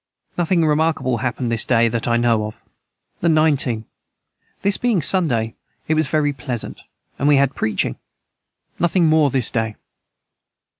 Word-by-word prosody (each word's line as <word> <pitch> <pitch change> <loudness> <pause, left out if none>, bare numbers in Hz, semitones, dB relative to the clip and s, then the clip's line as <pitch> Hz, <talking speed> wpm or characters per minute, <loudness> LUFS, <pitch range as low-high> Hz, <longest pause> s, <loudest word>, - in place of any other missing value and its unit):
Nothing 175 -1 +1
remarkable 150 -5 0
hapned 125 -1 -2
this 115 -2 +3
day 115 -2 +3
that 115 +1 -2
I 120 0 +2
know 115 -2 +1
of. 110 - -12 0.6
the 170 - +1
19. 145 -8 +1 0.8
This 200 0 +3
day - - -8
being 240 -6 +2
Sunday 135 -10 +2 0.3
it 160 - +1
was 155 -2 +3
very 145 -1 0
pleasant 125 -3 -5 0.4
and 140 - +1
we 145 - +5
had 140 0 +2
Preaching 100 - -1 0.8
Nothing 175 +1 +2
more 155 -2 +4
this 130 -2 0
day. 110 -3 -2
135 Hz, 150 wpm, -20 LUFS, 115-160 Hz, 0.8 s, we